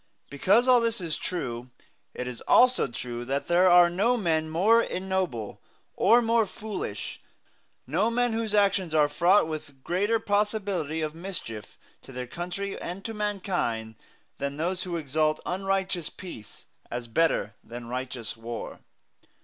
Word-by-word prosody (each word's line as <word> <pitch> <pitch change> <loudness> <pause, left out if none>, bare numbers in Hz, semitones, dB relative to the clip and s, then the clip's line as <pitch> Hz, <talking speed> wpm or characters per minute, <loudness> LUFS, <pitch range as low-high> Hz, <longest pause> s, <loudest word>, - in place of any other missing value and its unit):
Because 200 - +3
all 250 -2 +6
this 230 -1 0
is 165 -4 -3
true, 125 -8 -4 0.5
it 125 - -4
is 125 -2 -6
also 255 - +5
true 120 -1 -5
that 135 +3 -1
there 180 +2 +4
are 175 0 +8
no 205 +8 +2
men 160 -6 0
more 205 +9 +4
ignoble 185 - -2 0.3
or 235 +1 +5
more 230 -1 +3
foolish, 195 - -5 0.6
no 175 - +1
men 240 0 +1
whose 220 -2 -1
actions 195 -5 +2
are 150 -1 +5
fraught 170 +5 +4
with 145 -4 -7
greater 205 +6 +1
possibility 205 -7 0
of 155 -1 -2
mischief 165 - -7 0.2
to - - -13
their 125 -1 -5
country 180 +8 -5
and 180 +3 -6
to 225 - -4
mankind, 185 - -2 0.5
than 140 0 -3
those 180 +4 -1
who 175 -2 -3
exalt 155 +1 0
unrighteous 190 -2 -1
peace 115 - -10 0.2
as 120 0 -4
better 115 -4 +1
than 120 +1 -8
righteous 125 -1 -5
war. 115 +1 -6
175 Hz, 145 wpm, -27 LUFS, 135-200 Hz, 0.6 s, are